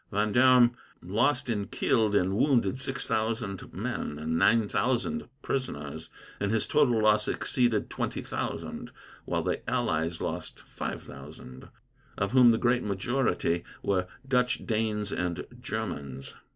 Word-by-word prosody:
Vendome 120 +4 +5 0.3
lost 120 +10 +1
in 105 -4 -1
killed 110 -4 +1
and 95 0 +2
wounded 125 -2 +2
six 135 +1 -2
thousand 110 -3 -2
men, 75 - -4
and 80 +2 -2
nine 105 +5 +4
thousand 130 - -1
prisoners, 80 - -4 0.3
and 100 0 0
his 110 -1 +1
total 130 -6 +3
loss 105 0 +4
exceeded 120 -4 +1
twenty - - -3
thousand; - - -4 0.4
while - - -1
the - - -1
allies 80 +1 0
lost - - -5
five - - -6
thousand, 65 0 -11 0.5
of 100 0 -1
whom 125 -2 +7
the 115 - +4
great 120 +1 +2
majority 100 -4 0 0.2
were 95 -2 +1 0.2
Dutch, 125 -1 +1
Danes, 110 -2 -1
and 90 -1 -2 0.2
Germans. 90 - -5
110 Hz, 130 wpm, -28 LUFS, 95-125 Hz, 0.5 s, whom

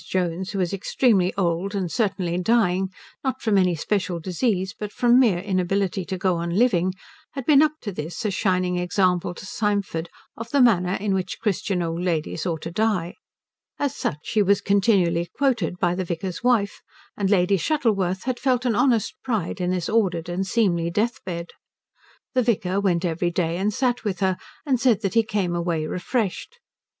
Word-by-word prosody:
Jones, 185 0 -1
who 200 - -4
was 185 -1 0
extremely 195 -1 +2
old 185 +2 -1
and 185 -4 -2
certainly 190 -6 0
dying 190 -2 +2 0.3
not 260 -1 -1
from 220 -4 +1
any 180 -3 +3
special 180 +1 -1
disease 190 +2 -1
but 210 -1 -6
from 245 +2 +4
mere 225 -9 +4
inability 190 +1 -1
to 190 0 -4
go 185 -2 +1
on 170 0 -2
living 185 -6 +2 0.4
had 270 -3 -5
been 290 -1 +6
up 305 -1 +3
to 205 - -4
this 165 +4 -5
a 210 - +1
shining 180 -2 0
example 180 -1 +1
to 190 - -9
Symford 200 -6 -2 0.3
of 230 0 -7
the 285 - +2
manner 190 -8 +4
in 200 0 -1
which 185 -1 -2
Christian 195 -4 -1
old 165 +1 -3
ladies 170 -1 -1
ought 160 -3 -3
to 165 - -5
die. 185 -3 0 0.6
As 285 -1 -1
such - - -2
she 215 - +1
was 200 0 +3
continually 185 -4 +2
quoted 240 - +1
by 175 -1 +1
the 185 +1 -2
vicar's 175 +1 -4
wife, 230 -5 +1 0.3
and 195 -2 -1
Lady 195 -1 +3
Shuttleworth 195 - 0
had 255 -1 -2
felt 255 -2 +1
an 240 - +2
honest 240 -1 +2
pride 205 -6 -2
in 180 - 0
this 180 -2 -1
ordered 185 -7 +1
and 180 +2 -2
seemly 180 -6 +1
death 220 +7 -1
bed. 170 -2 -5 0.8
The 255 - +3
vicar 200 -5 0
went 180 -3 +1
every 175 +1 0
day 170 -1 -1
and 200 +3 0
sat 245 +2 0
with 200 -4 -2
her 190 -1 +2 0.3
and 265 -4 +1
said 235 -5 +3
that 195 - -1
he 230 - +5
came 205 -5 -1
away 170 -2 -1
refreshed. 200 - -2
Mrs. 480 - -37
190 Hz, 185 wpm, -23 LUFS, 175-220 Hz, 0.8 s, been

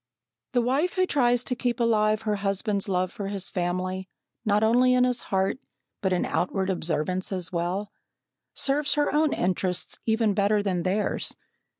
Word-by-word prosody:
The 245 -1 +3
wife 280 +9 +1
who 370 0 +2
tries 245 -7 +2
to 250 - -1
keep 245 -1 -2
alive 215 -2 +2
her 210 -2 0
husband's 200 +1 -1
love 185 -1 0
for 200 - -5
his 195 -2 -3
family, 185 0 -2 0.3
not 210 -1 +2
only 250 +3 +4
in 250 - +4
his 250 -1 +1
heart, 190 +5 0 0.4
but 190 -3 0
in 180 - +1
outward 190 +2 -1
observance 180 +2 -1
as 185 -2 -1
well, 180 +4 -2 0.6
serves 285 +1 +1
her 295 0 +1
own 305 0 +3
interests 180 0 -1
even 220 -2 +2
better 205 +1 +2
than 185 -3 0
theirs. 190 +4 -1
205 Hz, 165 wpm, -26 LUFS, 185-240 Hz, 0.6 s, only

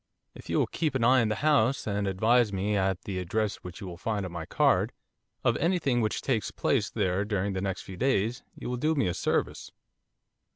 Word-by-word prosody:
'If - - -13
you - - +1
will - - +3
keep 155 -5 -2
an 125 - +1
eye 130 +2 +5
on 110 - +1
the 110 - 0
house 140 -3 +3
and 100 -1 -1
advise 110 +4 +3
me 100 +2 -1
at 95 -2 0
the 95 -2 -3
address 105 +3 -1
which 90 -1 -10
you - - -5
will 90 -2 -7
find 105 0 -2
on 90 - -6
my 85 -2 -6
card, - - +2 0.5
of - - +3
any 180 +3 +2
thing 130 -7 +1
which 110 -1 -1
takes 120 -6 0
place 115 -7 0
there 95 -2 0
during 100 -1 -1
the 95 - -2
next 95 -1 -3
few 95 - -9
days, 120 -2 +1
you - - -7
will 125 0 -2
do 155 +5 +1
me 140 - +2
a 90 - 0
service. - - -1
105 Hz, 225 wpm, -28 LUFS, 95-125 Hz, 0.5 s, eye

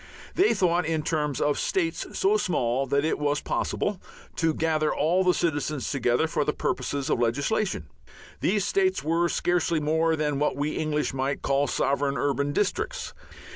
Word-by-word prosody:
They 390 +4 +3
thought 175 -3 +2
in 160 -2 -1
terms 150 -4 -1
of 145 -1 +1
states 165 -4 -1
so 200 +2 +3
small 135 - 0
that 140 +3 +1
it 160 - 0
was 145 0 +1
possible 200 -3 -2 0.4
to 165 -1 +2
gather 155 -1 +1
all 170 +6 +2
the 180 - +4
citizens 150 -5 -1
together 125 0 +1
for 155 -2 0
the 150 - 0
purposes 140 -2 -2
of - - +1
legislation. 140 - 0 0.5
These 200 +1 +1
states 380 -1 +1
were 170 +2 +1
scarcely 170 -2 +1
more 160 +2 +1
than 150 -2 -1
what 150 - +1
we 145 +2 -1
English 150 -2 -1
might 135 +1 -2
call 140 +1 +1
sovereign 140 +1 0
urban 140 0 0
districts. 210 - -2
155 Hz, 165 wpm, -26 LUFS, 140-170 Hz, 0.5 s, the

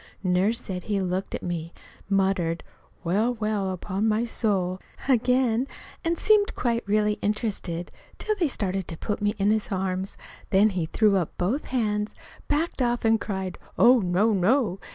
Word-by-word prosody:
Nurse 190 +5 +2
said 185 -6 -6
he 205 -2 0
looked 185 0 -2
at - - -6
me, 170 -1 -4 0.4
muttered, 190 -4 +1 0.4
"Well, 210 +8 +1
well, 215 -3 -1
upon 190 +3 -2
my 220 +1 +2
soul!" 190 -6 0 0.3
again, 250 -1 +3 0.4
and 335 0 0
seemed 420 +1 +4
really 235 -1 +2
quite 210 0 +2
interested 200 -5 -2 0.3
till 430 - -1
they 350 -5 +2
started 195 -7 -2
to 165 - -6
put 205 +4 -3
me 205 0 +1
in 200 +1 +3
his 215 -1 0
arms. 190 0 -2 0.3
Then 205 +2 +4
he 180 -4 -2
threw 210 +2 +3
up 175 -4 -2
both 220 +12 0
hands, 210 -4 -1 0.3
backed 300 0 0
off, 240 -1 +1
and 225 0 +4
cried, 190 -4 -4 0.2
"Oh, 245 +2 +7
no, 195 +3 +2
no!" 200 0 +2
210 Hz, 160 wpm, -26 LUFS, 185-230 Hz, 0.4 s, Oh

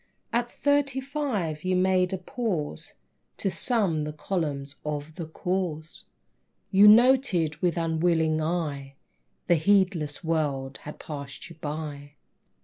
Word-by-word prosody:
At 240 +1 0
thirty 285 -2 +1
five 255 - -3
you 185 0 +1
made 185 0 +2
a 190 - -1
pause 185 - -4 0.4
To 195 - -1
sum 185 - +2
the 150 - -3
columns 150 -3 -3
of 150 +1 -4
The 160 0 -6
Cause; 165 -2 -3 0.7
You 200 +1 +7
noted, 215 - +5
with 175 0 0
unwilling 160 -1 +1
eye, 150 -5 -3 0.5
The 175 - +4
heedless 175 -4 +1
world 145 -5 -1
had 150 - -7
passed 140 +1 -8
you - - -11
by. 145 -2 -6
165 Hz, 125 wpm, -26 LUFS, 150-195 Hz, 0.7 s, You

